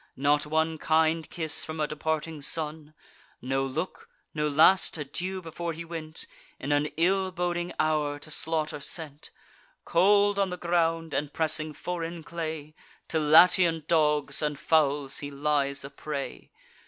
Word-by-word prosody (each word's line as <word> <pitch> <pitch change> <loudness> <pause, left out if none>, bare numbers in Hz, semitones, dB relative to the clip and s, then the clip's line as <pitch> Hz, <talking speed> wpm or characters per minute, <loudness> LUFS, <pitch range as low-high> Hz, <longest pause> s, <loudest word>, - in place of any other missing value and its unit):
Not 145 +2 +2
one 160 +1 0
kind 160 0 +2
kiss 160 -2 -2
from 155 0 -6
a 155 - +2
departing 155 0 -3
son! 155 +1 -3 0.4
No 135 +2 -1
look, 150 +7 -4 0.2
no 150 -1 0
last 160 +5 +4
adieu 175 +6 -4
before 165 +1 -4
he 165 +1 -7
went, 160 -2 -5 0.3
In 140 - -3
an 145 +1 +2
ill 190 +3 +2
boding 175 -1 -2
hour 150 -2 +1
to 155 +1 -11
slaughter 155 -1 -1
sent! 150 0 -6 0.6
Cold 200 +3 +4
on 195 -1 +2
the 180 - -5
ground, 165 -2 0
and 145 -1 -1
pressing 155 -1 +1
foreign 165 +1 -5
clay, 155 -2 -5 0.4
To 160 - +1
Latian 165 +1 +5
dogs 150 -4 +2
and 150 -1 -1
fowls 145 -3 +1
he 145 - -4
lies 140 -1 -1
a - - -7
prey! 140 -2 -6
155 Hz, 145 wpm, -27 LUFS, 150-170 Hz, 0.6 s, Latian